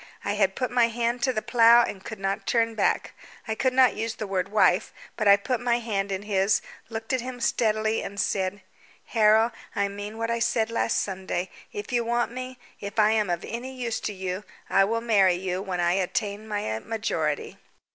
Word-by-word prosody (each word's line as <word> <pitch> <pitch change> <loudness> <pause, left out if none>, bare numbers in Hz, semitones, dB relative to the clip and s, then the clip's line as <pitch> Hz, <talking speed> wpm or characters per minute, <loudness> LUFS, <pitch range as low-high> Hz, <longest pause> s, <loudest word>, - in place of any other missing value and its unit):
I 200 - 0
had 195 -2 +1
put 255 - -2
my 245 -1 +4
hand 235 +1 -1
to 260 - +2
the 215 -4 -3
plough 235 +1 +6
and 190 -4 -5
could 220 - -7
not 195 0 -2
turn 230 -1 +2
back. 215 - 0 0.3
I 220 - 0
could 260 +4 +1
not 255 0 +5
use 225 0 -3
the 215 - -4
word 195 -1 -2
wife, 210 +1 +3 0.2
but 215 - 0
I 200 - +9
put 245 +4 -2
my 240 0 +1
hand 200 -4 -2
in 190 +1 -3
his, 200 -1 +2 0.3
looked 225 +2 -4
at 260 - +1
him 250 0 -6
steadily, 220 -2 +1
and 200 0 -6
said 190 0 -1 0.4
"Harold. 220 +1 +4 0.2
I 200 0 +1
meant 205 +2 -7
what 230 0 -1
I 235 - 0
said 230 -1 +1
last 230 - +1
Sunday. 190 -2 -3 0.2
If 415 - -6
you 240 -1 +1
want 235 0 0
me 255 +1 -6 0.2
if 200 +2 -7
I 215 0 +5
am 215 -3 +1
of 175 -1 -2
any 255 +3 -6
use 240 -3 -2
to 210 - -4
you 190 +1 -4 0.3
I 195 - +5
will 230 +3 -1
marry 200 -6 +4
you 185 0 -3
when 190 -3 -3
I 175 0 +2
attain 200 +3 -1
my 205 - -2
majority." 165 - -2
215 Hz, 205 wpm, -26 LUFS, 195-235 Hz, 0.4 s, I